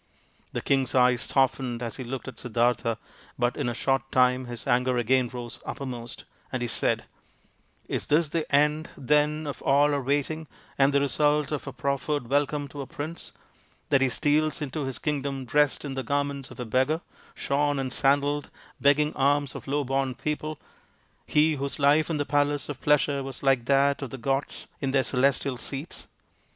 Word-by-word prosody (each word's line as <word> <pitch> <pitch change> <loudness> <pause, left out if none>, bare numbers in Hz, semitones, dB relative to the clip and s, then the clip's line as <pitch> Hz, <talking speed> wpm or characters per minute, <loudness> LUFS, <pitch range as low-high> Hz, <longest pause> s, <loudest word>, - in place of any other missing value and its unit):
The - - -2
king's 135 -3 +1
eyes 125 -1 +4
softened 130 -2 +1
as 115 - -4
he 130 - -5
looked 130 +2 -5
at 130 - -8
Siddartha, 120 -1 +1 0.4
but 120 0 +1
in - - -1
a 120 - -3
short 135 +1 0
time 125 0 +3
his 120 -1 -6
anger 125 0 +2
again 125 +1 +2
rose 120 -2 -7
uppermost, 125 -3 -6 0.3
and 130 -2 -2
he - - -1
said, - - 0 0.4
" - - -37 0.3
Is - - -3
this 150 +1 +3
the 165 0 -2
end, 150 +2 +3
then, 150 +2 +2
of 145 - -5
all 145 +2 +4
our 140 - 0
waiting 145 +4 -1 0.3
and 135 0 +4
the 140 - +3
result 150 +1 +2
of 150 - -3
our - - -3
proffered 140 -1 -2
welcome 145 0 +1
to 145 0 -7
a 135 - -6
prince, 155 +4 -6 0.6
that 135 -2 +4
he 135 - +3
steals 155 +5 +1
into 145 0 -3
his 135 -1 -3
kingdom 140 -3 -2
dressed 145 +3 +2
in 140 - -4
the 135 - -2
garments 140 +1 -2
of - - -13
a 125 - -3
beggar, 130 +8 +1 0.3
shorn 145 +1 0
and 130 -1 -2
sandalled, 145 +1 +2 0.3
begging 150 +2 +3
alms 140 0 +2
of - - -9
low 145 +1 0
born 135 -1 -1
people 150 0 -3 0.7
he 155 0 +3
whose 140 0 -2
life 145 +2 +4
in 160 - 0
the 145 - -1
palace 145 +1 +1
of 140 -3 -6
pleasure 145 -1 +2
was 135 -1 -6
like 135 -3 +3
that 140 +1 +3
of 135 - -4
the 135 - -7
gods 135 +3 -2
in 135 - -1
their 135 0 +3
celestial 130 0 +1
seats 140 +6 -5
140 Hz, 185 wpm, -27 LUFS, 130-145 Hz, 0.7 s, eyes